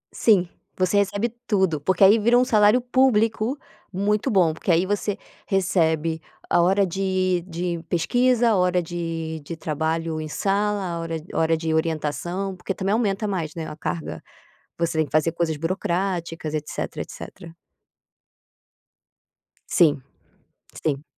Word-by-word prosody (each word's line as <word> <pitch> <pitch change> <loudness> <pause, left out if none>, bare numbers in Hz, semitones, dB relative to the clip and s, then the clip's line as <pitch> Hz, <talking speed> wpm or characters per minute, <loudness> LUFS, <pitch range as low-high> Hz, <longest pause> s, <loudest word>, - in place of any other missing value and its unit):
Sim, 195 -6 +4 0.3
você 185 +2 +2
recebe 205 +3 +1 0.2
tudo 190 -8 +1
porque 190 +5 +2
aí 205 +4 +7
vira 235 +3 +4
um 250 - +4
salário 210 +1 +4
público 245 -1 +2 0.3
muito 205 +5 0
bom, 180 -8 +3
porque 160 - -7
aí 170 +2 +3
você 205 +1 -1 0.3
recebe 165 -4 +1 0.3
a 175 - +3
hora 195 +3 +3
de 185 -1 0
de 170 -1 -3
pesquisa, 245 +6 +2
a - - +3
hora 180 -1 +2
de 165 -1 -4
de 165 +3 -7
trabalho 160 +1 -2
em 155 - -5
sala, 200 +5 0
a 170 -2 -3
hora 165 0 -4 0.2
hora 160 0 +2
de 160 0 -2
orientação, 165 +4 -2
porque 185 +1 -4
também 195 +1 -1
aumenta 215 -2 0
mais, 170 -6 -3
né, 165 -2 -5
a - - -7
carga. 165 +1 -4 0.6
Você 165 -1 0
tem 155 - +2
que - - -19
fazer 155 +2 +3
coisas 165 -2 -1
burocráticas, 170 -1 -2
etc. 150 -1 -4
etc. 165 -1 -10 2.2
Sim. 145 -6 +4 0.8
Sim. 145 -2 -1
180 Hz, 140 wpm, -23 LUFS, 165-200 Hz, 2.2 s, aí